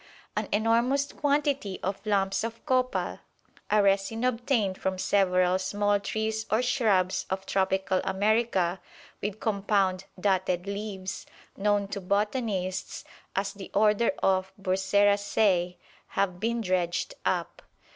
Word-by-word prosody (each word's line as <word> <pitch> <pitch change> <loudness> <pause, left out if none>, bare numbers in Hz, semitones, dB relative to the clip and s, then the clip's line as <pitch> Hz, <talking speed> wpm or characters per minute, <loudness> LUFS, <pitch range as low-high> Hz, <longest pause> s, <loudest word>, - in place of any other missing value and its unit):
An - - -1
enormous 235 +6 +2
quantity 280 -8 0
of 195 +2 -3
lumps 195 -1 +1
of 230 0 -6
copal, 255 -3 0 0.5
a 210 0 +4
resin 200 +4 +1
obtained 235 -5 0
from 190 0 -1
several 185 -1 +2
small 205 +2 +1
trees 220 +2 -2
or 220 +3 +2
shrubs 205 -7 +1
of 190 0 -3
tropical 190 -1 +1
America 190 -3 +1 0.4
with 205 +1 -3
compound 195 -3 +1
dotted 185 -2 +1
leaves, 200 -2 -5 0.3
known 205 0 +1
to 200 -1 -4
botanists 200 -1 -1 0.3
as 195 +1 -1
the 200 -1 -9
order 210 +2 +4
of 190 0 +2
Burseraceae, 195 -1 +2 0.3
have 190 -2 -1
been 230 +3 0
dredged 185 - -1
up. - - -1
200 Hz, 115 wpm, -28 LUFS, 190-220 Hz, 0.5 s, a